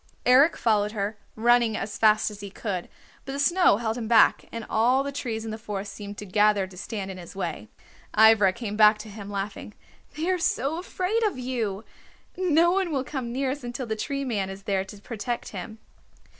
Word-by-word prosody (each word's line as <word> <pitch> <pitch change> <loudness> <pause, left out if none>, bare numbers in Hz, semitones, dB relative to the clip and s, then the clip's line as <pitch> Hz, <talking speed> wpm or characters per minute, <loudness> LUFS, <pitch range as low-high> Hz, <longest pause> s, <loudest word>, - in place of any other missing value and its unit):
Eric 270 +6 +6
followed 210 -2 +1
her, 205 0 -2 0.2
running 235 -1 +3
as 205 +1 -4
fast 215 0 +4
as 205 - -10
he 200 -1 -7
could, 190 -3 -4 0.3
but 270 - -6
the - - -3
snow 345 - +4
held 225 +1 -2
him 225 - -4
back, 225 -1 +5
and 230 -1 -6
all 250 +5 +3
the 280 - -4
trees 230 -5 -4
in 220 - -4
the 220 - -6
forest 205 -2 -5
seemed 205 0 -8
to 210 - -7
gather 205 0 +3
to 185 0 -14
stand 195 +1 -5
in 185 - -8
his 175 +2 -11
way. 165 - -4 0.5
Ivra 220 -3 +7
came 210 +1 -5
back 210 0 +6
to 215 0 -9
him, 205 -1 -9
laughing. 200 +1 -5 0.4
"They 320 +3 -2
are 365 - 0
so 320 -2 0
afraid 375 +4 -1
of 410 - -1
you! 230 -5 -3 0.5
No 345 -2 +3
one 375 -2 0
will 270 -3 0
come 260 -4 -5
near 260 +1 -1
us 285 0 -6
until 240 +1 -4
the 220 -1 -2
Tree 275 +5 -3
Man 205 -6 -1
is 195 +1 -9
there 195 -1 0
to 200 +2 -11
protect 230 +3 -5
him." 210 +3 -7
220 Hz, 210 wpm, -26 LUFS, 205-260 Hz, 0.5 s, Ivra